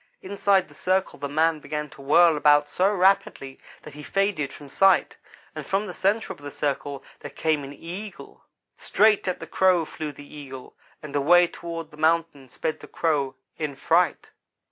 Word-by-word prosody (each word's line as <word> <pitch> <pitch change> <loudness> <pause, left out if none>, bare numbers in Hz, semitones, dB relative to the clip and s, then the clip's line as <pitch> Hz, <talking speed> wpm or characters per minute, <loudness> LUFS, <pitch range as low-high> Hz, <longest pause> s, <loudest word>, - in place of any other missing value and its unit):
Inside 195 -1 +1
the 145 - -18
circle 185 +5 -1
the 140 - -4
man 160 +2 +1
began 150 0 -5
to - - -14
whirl 160 +4 +5
about 145 0 +4
so 185 +6 +1
rapidly 190 -8 +1 0.2
that 150 - -11
he 150 - -10
faded 195 -6 -1
from 145 - -12
sight, 195 +7 +3 0.4
and - - -6
from 195 +1 -1
the 185 - -7
centre 205 +5 0
of - - -19
the 145 0 -8
circle 140 -1 -3 0.2
there - - -8
came 155 -3 -1
an 135 - -8
Eagle. 175 +5 -9 0.4
Straight 210 -2 +2
at 185 - -2
the - - -7
Crow 185 -3 +2
flew 155 0 -6
the 145 0 -13
Eagle, 135 -3 -11 0.3
and 150 -2 -8
away 175 +5 +5
toward 165 -2 -7
the 150 - -15
mountains 160 -4 0
sped 155 -1 -3
the - - -12
Crow, 140 -5 -1 0.2
in 150 -3 -3
fright. 165 +3 +1
160 Hz, 180 wpm, -24 LUFS, 145-185 Hz, 0.4 s, whirl